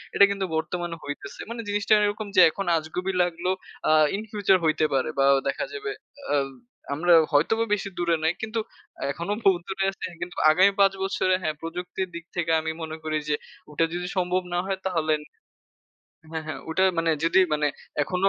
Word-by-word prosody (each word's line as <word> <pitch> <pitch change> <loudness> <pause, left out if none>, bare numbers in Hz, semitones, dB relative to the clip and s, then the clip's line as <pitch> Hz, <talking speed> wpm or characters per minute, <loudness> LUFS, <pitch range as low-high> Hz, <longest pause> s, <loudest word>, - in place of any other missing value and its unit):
এটা 200 - +8
কিন্তু 195 -1 -1
বর্তমানে 170 +2 -2
হইতেছে। 145 0 -7
মানে 230 0 -4
জিনিসটা 205 +1 +2
এরকম 205 +1 -2
যে, 185 - +8
এখন 195 - -4
আজগবি 170 +4 -3
লাগলেও 175 +1 0 0.4
আ - - +5 0.2
ইন 205 - -3
ফিউচার 200 -3 +3
হইতে 155 0 +2
পারে 135 +2 +1
বা 135 - +5 0.2
দেখা 140 - -1
যাবে 420 0 -4 0.4
আব 140 -1 +1 0.4
আমরাও 165 +2 +5
হয়তোবা 220 +11 +3
বেশি 200 -1 -1
দূরে 170 -1 +2
নাই। 160 +2 +3
কিন্তু 220 +1 -2 0.5
এখনো 170 +8 -3
বহুত 185 -3 +4
দূরে 195 0 -1
আছে 195 - -7 0.2
কিন্তু 175 0 -5 0.2
আগামী 185 +5 +5
৫ 195 -1 +5
বছরে 185 -1 +1
হ্যাঁ, 155 -3 -1
প্রযুক্তির 180 +3 -4
দিক 170 -1 -7
থেকে 170 -2 0
আমি 160 0 -2
মনে 160 0 -5
করি 155 0 -1
যে, 150 - +3 0.4
ওটা 155 +3 +2
যদি 180 +1 -3
সম্ভব 180 0 +1
না 175 - +1
হয় 195 0 -2
তাহলে 165 -4 +1 1.2
হ্যাঁ, 160 -1 -4
হ্যাঁ, 155 - -5
ওটা 175 +4 +1 0.2
মানে 165 0 +2
যদি 165 +3 +5
মানে 150 0 +2 0.4
এখনো 185 +5 +1
175 Hz, 180 wpm, -25 LUFS, 160-195 Hz, 1.2 s, এটা